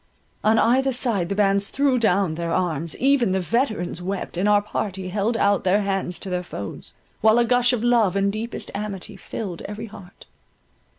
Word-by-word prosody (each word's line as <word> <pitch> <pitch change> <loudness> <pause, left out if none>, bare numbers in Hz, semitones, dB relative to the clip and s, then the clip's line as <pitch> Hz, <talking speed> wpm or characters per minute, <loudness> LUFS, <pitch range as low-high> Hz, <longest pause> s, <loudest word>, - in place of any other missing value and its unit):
On 220 +1 +4
either 265 +4 +3
side 220 -8 +1
the 200 - -1
bands 200 -1 +2
threw 275 -1 +1
down 195 -6 +2
their 170 +1 -3
arms, 165 -3 -1
even 260 -7 +2
the 190 - +1
veterans 210 - -1
wept, 190 +1 -4
and 190 +4 +1
our 205 0 +5
party 195 -2 -4
held 210 +4 0
out 200 -3 +2
their 195 +3 +2
hands 195 -3 -2
to 195 - -6
their 180 0 -1
foes, 100 - -8 0.3
while 220 +1 +5
a 240 - +4
gush 245 +1 +4
of 240 -3 -1
love 235 -6 +3
and 200 0 +1
deepest 225 +2 -5
amity 200 -2 -5
filled 190 -7 -6
every 210 +2 -6
heart. 200 -3 -13
205 Hz, 185 wpm, -23 LUFS, 185-230 Hz, 0.3 s, our